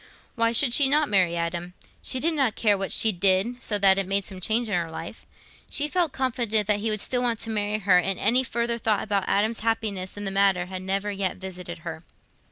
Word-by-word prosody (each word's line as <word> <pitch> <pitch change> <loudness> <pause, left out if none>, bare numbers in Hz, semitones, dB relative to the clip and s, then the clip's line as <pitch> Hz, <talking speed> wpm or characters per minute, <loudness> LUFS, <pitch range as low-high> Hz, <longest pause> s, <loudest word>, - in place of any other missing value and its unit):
Why 230 -1 +1
should 235 +1 +4
she 270 +1 +5
not 300 +1 +2
marry 185 -4 +2
Adam? 170 +1 -4 0.3
She 260 - -3
did 330 +5 +1
not 270 -8 +1
care 210 -3 +3
what 195 0 -3
she 220 - +4
did, 195 +6 +1
so 210 - 0
that 195 -1 +4
it 195 - -2
made 195 0 0
some 190 -2 -7
change 225 +4 +1
in 210 - -4
her 170 -2 -1
life. 160 - -9 0.4
She 295 - -1
felt 345 -1 0
confident 235 -5 -1
that 205 0 +1
he 220 +2 -1
would 215 -1 0
still 250 -1 0
want 240 -2 0
to 225 - -4
marry 210 0 -1
her, 195 -4 +4
and 190 +1 -1
any 245 +5 +3
further 235 -2 -2
thought 215 -2 0
about 200 -3 -1
Adam's 215 +3 +1
happiness 215 -4 -2
in 205 - -5
the 195 - -2
matter 195 -2 +2
had 185 0 -7
never 195 +2 -2
yet 195 -2 -2
visited 180 -2 -8
her. 160 -1 -6
205 Hz, 230 wpm, -25 LUFS, 190-230 Hz, 0.4 s, she